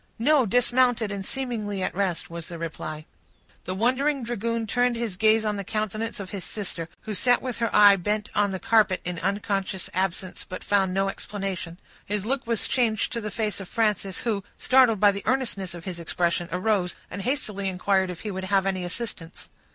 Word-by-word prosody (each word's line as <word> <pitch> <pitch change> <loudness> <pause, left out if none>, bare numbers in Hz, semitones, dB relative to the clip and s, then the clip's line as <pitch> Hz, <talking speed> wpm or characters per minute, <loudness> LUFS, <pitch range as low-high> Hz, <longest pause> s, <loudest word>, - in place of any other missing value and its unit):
"No, 265 +1 +4
dismounted, 245 -1 +3
and 200 -1 -4
seemingly 215 -5 -3
at - - -1
rest," 190 -3 -1
was 170 -1 -7
the 170 - -7
reply. 155 -2 -5 0.6
The 185 - -3
wondering 260 +6 +1
dragoon 230 0 -1
turned 245 +2 +2
his 230 -5 -3
gaze 220 +2 +4
on 210 -1 0
the 200 - -3
countenance 215 +3 -3
of 195 -2 -6
his 195 -3 -5
sister, 180 -5 -4
who 215 - -5
sat 245 +5 +3
with 250 -4 -5
her 230 -1 +1
eye 205 -1 +8
bent 210 +3 -1
on 205 -1 +3
the 190 - -2
carpet 215 -4 +3
in 180 -1 -3
unconscious 195 -1 -1
absence, 185 0 -2
but 185 - -7
found 195 -2 +2
no 195 +1 +1
explanation. 195 -4 -4 0.3
His 205 0 -2
look 265 +1 -1
was 230 -2 +1
changed 230 -4 +1
to 235 - -3
the 210 - -3
face 210 -2 -2
of 195 - -8
Frances, 210 -4 0
who, 210 -5 -1
startled 255 -5 +5
by 205 0 +6
the 200 0 -5
earnestness 205 -9 -1
of 170 - -10
his 180 -3 -4
expression, 170 +1 -1
arose, 185 0 +1 0.2
and 200 - -4
hastily 210 -6 -1
inquired 190 0 +1
if 180 - -6
he 210 - -4
would 190 0 -4
have 195 0 +2
any 190 -2 -1
assistance. 175 -3 -6
205 Hz, 195 wpm, -26 LUFS, 185-230 Hz, 0.6 s, eye